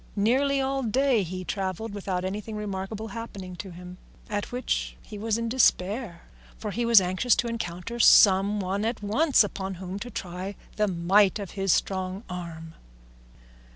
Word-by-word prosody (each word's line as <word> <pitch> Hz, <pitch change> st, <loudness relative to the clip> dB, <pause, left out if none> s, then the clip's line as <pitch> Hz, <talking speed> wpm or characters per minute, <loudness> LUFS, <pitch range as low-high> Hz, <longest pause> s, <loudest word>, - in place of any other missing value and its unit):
Nearly 265 Hz, +7 st, +2 dB
all 270 Hz, 0 st, 0 dB
day 255 Hz, 0 st, +2 dB
he 185 Hz, 0 st, -5 dB
travelled 195 Hz, +3 st, -3 dB
without 185 Hz, -2 st, -3 dB
anything 210 Hz, +3 st, -4 dB
remarkable 210 Hz, +1 st, -4 dB
happening 195 Hz, -4 st, -7 dB
to 195 Hz, -, -7 dB
him, 180 Hz, +1 st, -10 dB, 0.3 s
at 205 Hz, +3 st, -2 dB
which 250 Hz, +1 st, -2 dB
he 210 Hz, -, -9 dB
was 220 Hz, +1 st, 0 dB
in 230 Hz, 0 st, -2 dB
despair, 210 Hz, -5 st, +1 dB, 0.3 s
for 210 Hz, -, -5 dB
he 235 Hz, +4 st, -1 dB
was 230 Hz, -2 st, +8 dB
anxious 185 Hz, +6 st, +2 dB
to 240 Hz, -, 0 dB
encounter 230 Hz, 0 st, -5 dB
some 200 Hz, -1 st, +6 dB
one 195 Hz, +2 st, -2 dB
at 225 Hz, -1 st, -2 dB
once 270 Hz, +7 st, +4 dB
upon 195 Hz, -1 st, -4 dB
whom 185 Hz, +2 st, -6 dB
to 245 Hz, -, -6 dB
try 185 Hz, -1 st, -5 dB, 0.2 s
the 210 Hz, 0 st, +2 dB
might 190 Hz, +3 st, +3 dB
of 200 Hz, -3 st, -6 dB
his 195 Hz, -2 st, 0 dB
strong 190 Hz, +2 st, -1 dB
arm. 165 Hz, -2 st, -7 dB
200 Hz, 160 wpm, -26 LUFS, 185-225 Hz, 0.3 s, was